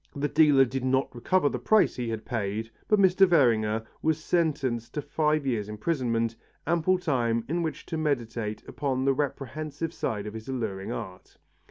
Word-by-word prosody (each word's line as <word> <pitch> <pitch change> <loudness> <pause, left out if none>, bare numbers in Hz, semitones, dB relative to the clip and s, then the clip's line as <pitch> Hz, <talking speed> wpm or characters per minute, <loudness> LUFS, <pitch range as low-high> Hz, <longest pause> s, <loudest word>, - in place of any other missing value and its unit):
The 145 +1 0
dealer 145 -4 +5
did 130 +1 -4
not 130 +1 +1
recover 145 +7 +1
the 125 - -2
price 215 - +3
he 120 -2 -3
had 110 -1 -4
paid 110 -1 -3 0.2
but 210 - +4
Mr. 190 0 +5
Werninger 115 -9 +3 0.2
was 160 -1 +1
sentenced 150 -8 -1
to 150 - -1
five 150 -1 0
years' 110 -6 -1
imprisonment, 115 -1 -1 0.3
ample 170 +3 +2
time 120 -9 0
in 170 +3 -1
which 160 -2 -4
to 160 - -4
meditate 115 -7 -2
upon 130 -2 -2
the 135 - +4
reprehensible 150 +3 -3
side 105 -9 -3
of 105 - -6
his 110 +2 -8
alluring 110 -7 -3
art. 90 -1 -8
135 Hz, 170 wpm, -27 LUFS, 115-155 Hz, 0.3 s, dealer